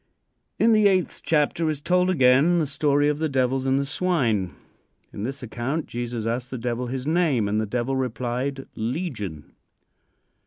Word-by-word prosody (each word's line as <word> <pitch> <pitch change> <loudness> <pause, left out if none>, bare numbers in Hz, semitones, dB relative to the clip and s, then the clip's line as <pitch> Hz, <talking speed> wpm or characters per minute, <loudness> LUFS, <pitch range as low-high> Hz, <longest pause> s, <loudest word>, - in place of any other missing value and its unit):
In 230 - +4
the 215 -2 +5
eighth 185 -3 0
chapter 160 +1 +1
is 150 -2 -2
told 180 +4 +2
again 140 +1 +4
the 160 - +2
story 145 0 +1
of 150 0 0
the 160 -1 0
devils 130 0 0
and 135 0 +3
the 140 - 0
swine. 135 - 0 0.6
In 100 - -4
this 135 +1 -5
account, 125 +7 -3
Jesus 120 -2 -4
asked 120 +2 -2
the 130 - -5
devil 120 +1 -3
his 130 +1 -4
name, 155 - +2
and 105 +2 0
the 110 - -3
devil 120 +4 -1
replied 130 +2 -2
"Legion." 110 - -4
135 Hz, 165 wpm, -24 LUFS, 120-155 Hz, 0.6 s, the